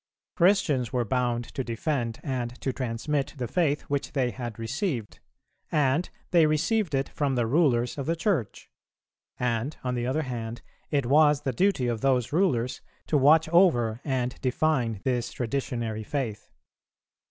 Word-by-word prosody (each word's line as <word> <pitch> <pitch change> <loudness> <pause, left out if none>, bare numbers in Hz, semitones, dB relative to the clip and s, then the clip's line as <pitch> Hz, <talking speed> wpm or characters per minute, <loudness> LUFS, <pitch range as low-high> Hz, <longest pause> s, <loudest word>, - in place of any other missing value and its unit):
Christians 170 - +3
were 125 -2 0
bound 120 +1 0
to 135 - -2
defend 120 -1 -2
and 125 -3 -3
to 130 - -1
transmit 135 +4 -2
the 125 -2 -3
faith 155 -3 +1
which 140 -2 -3
they 130 -4 +1
had 120 -4 -6
received, 120 - -3 0.5
and 150 +3 +2 0.2
they 170 -4 +5
received 165 +3 +1
it 135 0 -1
from 140 -3 -1
the 120 -2 +1
rulers 125 -2 +2
of 140 - -4
the 165 - +1
Church; 165 - -2 0.7
and, 125 +3 -1
on 125 -1 -1
the 120 0 -2
other 150 +5 0
hand, 120 -3 -5 0.3
it 140 -4 +1
was 150 +2 +4
the 135 -3 -2
duty 185 - +2
of 120 -2 -1
those 130 -2 +1
rulers 130 -9 +1 0.2
to - - -1
watch 150 +3 +5
over 125 - +3
and 130 -3 -2
define 125 -6 0
this 125 -2 -1
traditionary 120 -3 -3
faith. 110 -3 -4
130 Hz, 155 wpm, -27 LUFS, 120-150 Hz, 0.7 s, they